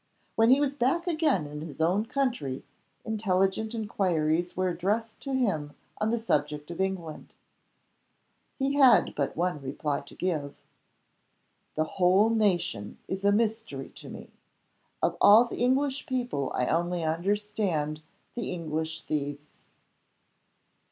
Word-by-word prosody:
When 225 +1 +4
he 265 +2 +6
was 285 -1 +1
back 280 +6 +1
again 310 - +1
in 150 +1 -7
his 155 -3 -8
own 185 +7 +2
country, 240 - -1 0.4
intelligent 215 0 0
inquiries 175 -6 0
were 185 0 +1
addressed 210 +6 -2
to 275 - -4
him 160 - -1 0.2
on 215 - +1
the 235 - +1
subject 150 -7 -1
of 170 - -4
England. 185 -5 -4 1.2
He 275 0 0
had 265 -4 +6
but 140 0 -2
one 175 -3 0
reply 140 +2 -2
to 140 - -14
give. 155 -6 -2 1.2
"The 155 - +2
whole 185 +6 +3
nation 180 - 0
is 190 +1 -4
a 200 - +5
mystery 215 -10 -1
to - - -10
me. - - -10 0.7
Of - - +2
all 215 +4 +8
the 235 - -7
English 270 +3 +1
people 245 - -2
I 125 - +1
only 175 +3 0
understand 175 -2 -1 0.3
the 240 -3 -4
English 160 -2 -3
thieves!" 145 0 -4
185 Hz, 130 wpm, -28 LUFS, 155-225 Hz, 1.2 s, all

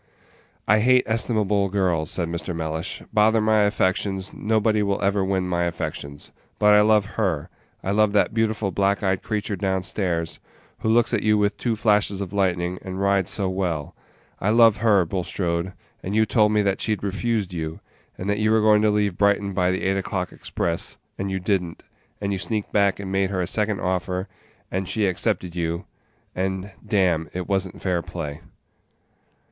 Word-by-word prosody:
"I 110 +2 +5
hate 125 +3 +4
estimable 105 -3 +1
girls," 90 -5 0
said 85 -2 -1
Mr. 85 +1 -4
Mellish; 80 +2 -4
"bother 110 +1 +4
my 110 0 +3
affections, 100 -1 0
nobody 110 0 +1
will 100 -1 0
ever 100 0 +2
win 95 -1 0
my 85 -1 0
affections; 80 -4 -5 0.3
but 105 0 +5
I 105 - +7
love 105 -1 +4 0.2
her, 85 -8 -1 0.3
I 95 - -1
love 105 0 +3
that 105 - +2
beautiful 110 -3 0
black 100 +1 +1
eyed 95 -1 +1
creature 105 -1 -2
down 95 -1 -1
stairs, 85 -4 -2 0.4
who 110 - -1
looks 120 +1 +3
at 115 - +2
you 105 0 +3
with 100 0 +1
two 120 -2 -1
flashes 105 -2 +2
of 100 -1 -5
lightning, 90 -2 0
and 95 0 -6
rides 100 -2 +2
so 100 -2 0
well; 90 -6 -2 0.5
I 100 - 0
love 115 -1 +6
her, 105 -4 +3
Bulstrode, 85 0 -2 0.3
and 100 +3 -4
you 110 0 +4
told 105 -1 +3
me 105 -1 +3
that 100 -1 0
she'd 110 -2 -1
refused 100 -1 -1
you, 80 -2 -4 0.4
and 95 - -5
that 105 0 0
you 110 0 +2
were 110 0 +4
going 105 -1 +5
to 110 - +3
leave 105 -3 0
Brighton 100 -1 +2
by 90 -1 +2
the 95 0 -1
eight 95 +1 +1
o'clock 95 -2 -3
express, 85 -1 -3 0.2
and 95 0 -2
you 95 0 -2
did 95 +1 +1
n't, 85 -2 -9 0.4
and 100 -1 -2
you 95 - -2
sneaked 105 +1 -3
back 100 -1 +3
and 95 -1 -5
made 95 0 +1
her 95 -2 -2
a - - -1
second 105 +2 -1
offer, 90 +1 -2 0.4
and 95 0 -2
she 110 -2 +1
accepted 90 -2 -1
you, 85 +2 -2 0.5
and, 95 +1 -3
damme, 90 -7 +1
it 90 -1 -3
was 95 -1 +1
n't - - -13
fair 90 -3 +1
play." 85 -4 -6
100 Hz, 185 wpm, -23 LUFS, 90-105 Hz, 0.5 s, I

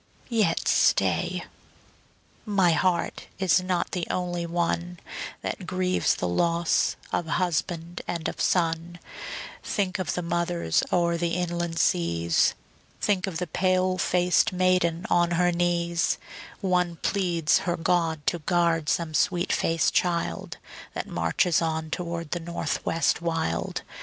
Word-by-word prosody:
Yet 225 -4 +1
stay, - - +2 1.0
my 195 -5 +3
heart 175 +3 0
is 190 -1 +3
not 185 -1 -1
the 175 -2 -2
only 175 -1 -2
one 175 +1 -1 0.4
That 185 - -4
grieves 185 0 +1
the 90 - -2
loss 170 - +1 0.2
of 170 - 0
husband 170 0 -1
and 170 -2 -2
of - - -4
son; 170 0 0 0.6
Think 195 -3 -1
of 185 - -1
the 180 - -2
mothers 170 - 0
o'er 170 -1 +2
the 170 0 -1
inland 175 -1 -2
seas; 85 - +2 0.4
Think 195 -1 +1
of 180 -4 -3
the 180 - -2
pale 185 +2 +1
faced 180 -1 +3
maiden 180 -1 +1
on 175 0 +4
her 180 0 +3
knees; 170 -1 +1 0.4
One 180 -3 +1
pleads 170 -4 +1
her 175 - 0
God 165 -3 0
to 175 - +1
guard 165 -2 +1
some 165 -2 0
sweet 175 +4 +1
faced 165 -1 +1
child 170 - -1 0.4
That - - -3
marches 115 - +1
on 160 -1 -2
toward 170 -2 -4
the 175 - -1
North 170 -1 -3
West 165 +1 +1
wild. 165 -1 -2
175 Hz, 130 wpm, -26 LUFS, 165-180 Hz, 1.0 s, on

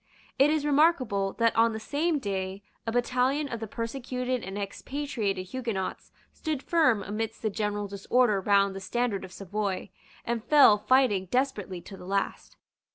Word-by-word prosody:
It 275 +2 +6
is 305 -1 +1
remarkable 275 - +2
that 230 -1 +2
on 230 0 +4
the 220 - -4
same 300 +8 0
day 195 -4 -3 0.2
a - - +1
battalion 250 +4 +1
of 235 -4 -5
the 225 - -5
persecuted 250 +2 -3
and 195 +2 -6
expatriated 205 -2 -3
Huguenots 230 -6 -4 0.2
stood 310 -4 -3
firm 285 - +3
amidst 220 +3 -4
the 220 - 0
general 205 -1 -2
disorder 200 +2 +2
round 200 0 +3
the - - -4
standard 225 0 -1
of 190 - -9
Savoy, 195 0 -3 0.3
and 235 -1 -2
fell 275 -8 +6
fighting 210 -5 +3
desperately 210 -8 -1
to 195 - -10
the 180 - -11
last. 195 0 -2
225 Hz, 160 wpm, -28 LUFS, 200-260 Hz, 0.3 s, It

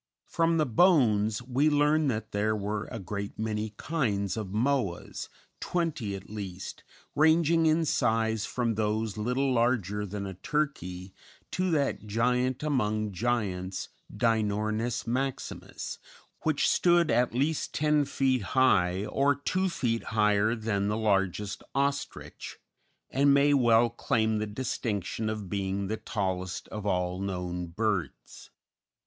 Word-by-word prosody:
] - - -65
From 165 -1 +3
the 155 - +3
bones 115 - +3
we 130 +5 +2
learn 150 +1 +3
that 110 -4 -2
there 105 +1 +1
were 105 0 -3
a 120 - -6
great 100 0 -5
many 110 -1 -3
kinds 105 - -1
of 110 -3 -4
Moas, 110 -2 -1 0.3
twenty 155 - -2
at 95 - -9
least, 95 -3 -7 0.3
ranging 160 +1 +4
in 160 +1 +3
size 110 -5 +1
from 120 -2 -1
those 110 -1 -1
little 125 +5 0
larger 115 -4 +1
than 100 +1 -5
a 95 - -5
turkey 95 - -3 0.4
to 185 0 0
that 140 -8 0
giant 125 +4 +1
among 110 -7 0
giants, 95 -3 -2 0.2
Dinornis 110 0 0
maximus, 130 +3 -4 0.4
which 155 -2 +1
stood 175 -3 +4
at 120 +1 +2
least 145 +5 0
ten 150 -1 +2
feet 130 -2 +1 0.2
high, 95 -7 +3
or 140 +5 +2
two 185 +7 0
feet 115 -9 -1
higher 105 0 +2
than 110 -3 -1
the 105 +1 0
largest 100 -2 0
ostrich, 140 +1 -3 0.5
and 140 +1 +4
may 145 +1 +4
well 120 -3 +4
claim 110 -3 0
the 110 - -2
distinction 110 -2 -3
of 105 -2 -4
being 100 0 -2
the 110 - -1
tallest 95 -4 -3
of 105 -1 -5
all 90 -1 0
known 90 -2 -3
birds. 85 - -3
110 Hz, 130 wpm, -28 LUFS, 100-135 Hz, 0.5 s, ranging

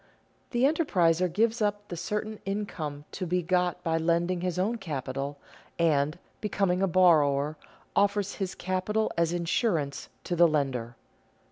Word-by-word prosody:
_The 240 - 0
enterpriser 185 - +3
gives 225 +5 +1
up 205 0 0
the 175 - -4
certain 210 +5 -3
income 165 -8 -4
to 185 - -4
be 180 +1 0
got 180 0 0
by 165 0 +1
lending 170 +2 +1
his 180 -1 -2
own 215 +6 0
capital, 140 -4 -4 0.4
and, 155 -2 +2 0.2
becoming 195 -3 0
a 195 - +3
borrower, 155 -5 +4 0.4
offers 200 0 +2
his 190 -2 -3
capital 185 +4 -1
as 170 -1 +2
insurance 170 - -1
to 175 - -2
the 170 0 +6
lender. 130 -6 -1
175 Hz, 140 wpm, -28 LUFS, 160-200 Hz, 0.4 s, the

